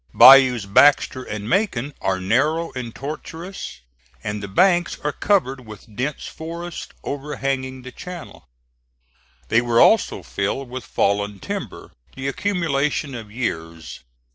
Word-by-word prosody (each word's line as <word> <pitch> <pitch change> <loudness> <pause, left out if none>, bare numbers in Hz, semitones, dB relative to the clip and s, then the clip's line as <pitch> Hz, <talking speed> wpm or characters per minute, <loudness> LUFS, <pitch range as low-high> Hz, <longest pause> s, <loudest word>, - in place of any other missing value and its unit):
Bayous 130 -5 +8
Baxter 130 +5 +4
and 105 -4 -6
Macon 145 - 0
are 95 -1 0
narrow 145 - +1
and 125 -3 -6
tortuous, 160 - -7 0.4
and 105 0 -3
the 100 - -5
banks 175 - +3
are 150 - -1
covered 135 -9 0
with 110 0 -12
dense 135 +5 -3
forests 170 +1 -7
overhanging 135 -2 -3
the 130 - -9
channel. 180 - -10 1.0
They 115 +2 +4
were 120 -1 +2
also 225 - +4
filled 120 +6 -3
with 130 -1 -6
fallen 100 0 0
timber, - - -6 0.2
the 135 0 -4
accumulation 150 -4 -1
of 110 -4 -8
years. 85 -8 -5
130 Hz, 125 wpm, -22 LUFS, 110-150 Hz, 1.0 s, Bayous